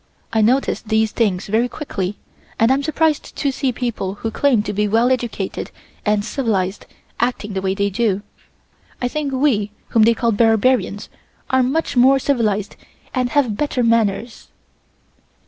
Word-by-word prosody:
I 220 - +3
notice 250 +6 +2
these 220 -1 +1
things 200 -5 0
very 225 +4 +1
quickly 200 -10 -4 0.4
and 225 +3 +4
am 270 +1 +2
surprised 310 +1 0
to 280 - 0
see 265 0 -1
people 230 -6 -3
who 225 +2 -4
claim 245 -4 +2
to 210 - -4
be 210 +1 +1
well 230 +4 +3
educated 235 -6 -2 0.3
and 210 -1 +1
civilized 210 -7 -2 0.3
acting 235 -4 -1
the 190 - -2
way 190 0 -1
they 200 0 0
do. 205 -1 0 0.8
I 245 - 0
think 290 +2 -3
we 260 -7 +1 0.2
whom 225 - +3
they 230 +2 +5
call 235 0 +1
barbarians 225 0 +2 0.4
are 260 0 +4
much 270 +6 0
more 260 +2 +6
civilized 220 -7 0 0.4
and 255 -2 0
have 250 -6 +1
better 270 -1 -1
manners." 230 0 0
230 Hz, 155 wpm, -20 LUFS, 210-260 Hz, 0.8 s, more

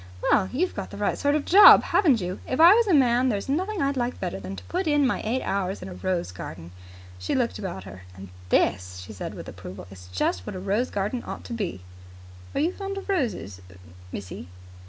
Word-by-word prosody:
Well, 190 -2 +3
you've 355 +9 -1
got - - -5
the - - -9
right - - 0
sort 285 +1 +1
of 300 - 0
a - - -17
job, 400 +4 +9
haven't 280 - +3
you! 180 +1 -4
If 255 - -2
I 340 +4 +9
was 460 +1 +3
a 380 - +3
man, 255 -1 +3
there's 205 -4 -2
nothing 365 +6 -1
I'd 275 0 0
like 245 -1 -2
better 95 - -4
than 95 0 -7
to - - -10
put 365 0 -3
in 295 -2 +3
my 250 - 0
eight 245 +4 -1
hours 195 -1 -2
in - - -7
a - - -8
rose 180 - -2
garden." 85 -1 -9 0.5
She 90 - -2
looked 245 -2 -1
about 180 - -5
her. 95 -1 -11
"And 95 0 -10 0.2
this," 90 0 +1
she 110 - -10
said 100 - -6
with - - -9
approval, 95 - -9
"is 90 -1 -12
just 90 0 -1
what - - -5
a - - -5
rose 200 +6 -1
garden 205 +5 -2
ought - - -7
to 240 - -7
be." 200 - -4 0.7
"Are - - +1
you 320 +5 +2
fond 395 0 -5
of 390 - -8
roses 210 - -2 0.5
missy?" 95 -4 -7
215 Hz, 230 wpm, -25 LUFS, -, 0.7 s, job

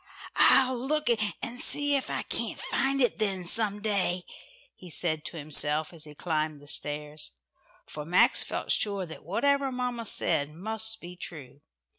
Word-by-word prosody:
"I'll 260 -2 +5
look 300 +3 -1 0.3
and 245 0 -4
see 290 0 +4
if 270 - -1
I - - -2
can't - - -2
find 275 0 +1
it 245 - +1
then, 195 -4 0
some 205 +1 +2
day," 185 -4 +1 0.5
he 180 - -12
said 155 -2 0
to 170 - -6
himself, 150 +1 +2
as 160 -2 -12
he 150 -1 -13
climbed 155 -2 -3
up 145 - -9
stairs. 150 - -5 0.5
For 150 - -7
Max 175 +4 +3
felt - - -4
sure 200 -3 0
that 160 - -10
whatever 280 -1 +1
mamma 250 -2 -3
said 150 -7 +2
must 220 +6 -3
be 175 +1 -10
true. 145 -6 -8
185 Hz, 160 wpm, -28 LUFS, 155-240 Hz, 0.5 s, I'll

